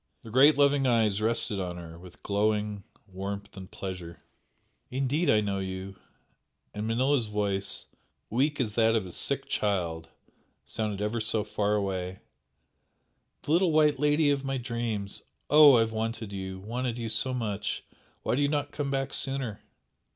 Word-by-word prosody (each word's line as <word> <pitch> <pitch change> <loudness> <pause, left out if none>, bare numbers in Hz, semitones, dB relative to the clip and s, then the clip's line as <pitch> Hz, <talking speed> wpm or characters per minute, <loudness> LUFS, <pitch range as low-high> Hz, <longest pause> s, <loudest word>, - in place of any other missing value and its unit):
The 115 - -10
great 140 +5 +6
loving 140 -1 +4
eyes 110 -4 +2
rested 110 -2 0
on 90 -2 -4
her 85 -1 -9
with 90 0 -14
glowing 105 0 0 0.2
warmth 100 +1 -6
and 95 -1 -9
pleasure. 90 -3 -7 0.7
"Indeed 135 +6 0
I 105 -1 +5
know 100 -2 -1
you!" 95 0 -5 0.8
and 105 +1 -3
Manella's 125 +1 +2
voice, 100 -2 0 0.4
weak 140 +6 0
as 110 -5 0
that 115 0 +3
of 110 -4 0
a 90 - -8
sick - - -2
child, 85 -6 -1 0.6
sounded 105 -2 -3
ever 110 +2 -1
so 110 0 +2
far 105 0 0
away 95 -2 -2 1.3
"The - - -3
little 175 +1 +4
white 150 -3 +4
lady 150 0 +3
of 140 -1 0
my 135 0 -1
dreams! 115 -5 -3 0.3
Oh, 150 -2 +9
I - - +5
have 115 0 0
wanted 110 -1 -3
you! 95 -1 -5
wanted 120 +4 -3
you 115 -1 -3
so 130 +4 +2
much! 110 -5 -3 0.4
Why - - 0
did 135 - +1
you 140 - +3
not 145 -1 -1
come 145 -1 -3
back 135 0 -2
sooner?" 135 -6 -2
110 Hz, 160 wpm, -28 LUFS, 100-130 Hz, 1.3 s, Oh